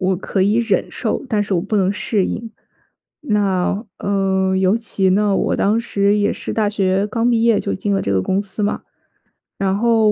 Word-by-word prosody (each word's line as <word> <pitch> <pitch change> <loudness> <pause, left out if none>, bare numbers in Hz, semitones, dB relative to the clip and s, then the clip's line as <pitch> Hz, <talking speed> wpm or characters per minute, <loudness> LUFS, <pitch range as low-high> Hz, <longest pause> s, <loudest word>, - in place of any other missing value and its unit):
我 185 0 +1
可 195 +1 -3
以 200 +3 +2
忍 225 -5 +1
受， 235 +4 -3
但 215 -3 +1
是 200 -1 -2
我 170 - +1
不 215 - -2
能 195 -1 +2
适 205 -1 -1
应。 230 0 -5 0.7
那， 200 -3 0
呃， 190 -1 0
尤 190 +2 +3
其 195 -5 0
呢， 205 +1 +2
我 - - 0
当 215 +3 +2
时 200 -3 +1
也 205 0 +1
是 - - -6
大 215 -2 +1
学 195 -1 0
刚 230 +3 0
毕 230 -1 +2
业 230 -2 +4
就 200 - -2
进 200 +2 -2
了 195 - +1
这 100 - -1
个 95 -1 +1
公 190 - 0
司 205 +1 -6
嘛。 205 - -1 0.8
然 195 -1 0
后 225 -1 +3
200 Hz, 220 characters per minute, -19 LUFS, 190-215 Hz, 0.8 s, 业